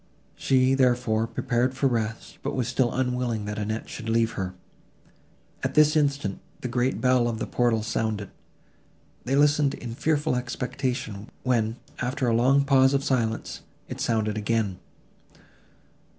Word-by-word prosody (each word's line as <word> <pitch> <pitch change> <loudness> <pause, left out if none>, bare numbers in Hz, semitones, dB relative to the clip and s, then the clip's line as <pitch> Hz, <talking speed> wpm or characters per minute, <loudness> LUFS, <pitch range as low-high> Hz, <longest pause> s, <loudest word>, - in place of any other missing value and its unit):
She, 130 0 +3
therefore, 120 -4 +2
prepared 125 +2 0
for 135 - -1
rest, 115 -3 -2
but - - -3
was 125 -3 -1
still 125 0 +1
unwilling 125 -4 -1
that 105 +1 -4
Annette 110 +2 -3
should 115 -1 -6
leave 115 0 +2
her. 95 -2 -4 1.1
At - - -2
this 150 0 +5
instant, 140 -9 0 0.2
the - - -3
great 125 +1 0
bell 125 -2 +3
of 115 -1 -2
the - - -3
portal 120 -3 +1
sounded. 110 -3 -2 0.9
They 130 +2 +1
listened 145 0 +3
in 120 -2 -7
fearful 150 +2 0
expectation, 125 -3 -3
when, 115 -3 +1 0.2
after 130 +1 -1
a 115 - +2
long 135 +4 +4
pause 135 -1 +5
of 140 - +1
silence, 115 -5 -1 0.3
it - - -6
sounded 110 -2 0
again. 105 -3 -1
120 Hz, 145 wpm, -26 LUFS, 110-130 Hz, 1.1 s, this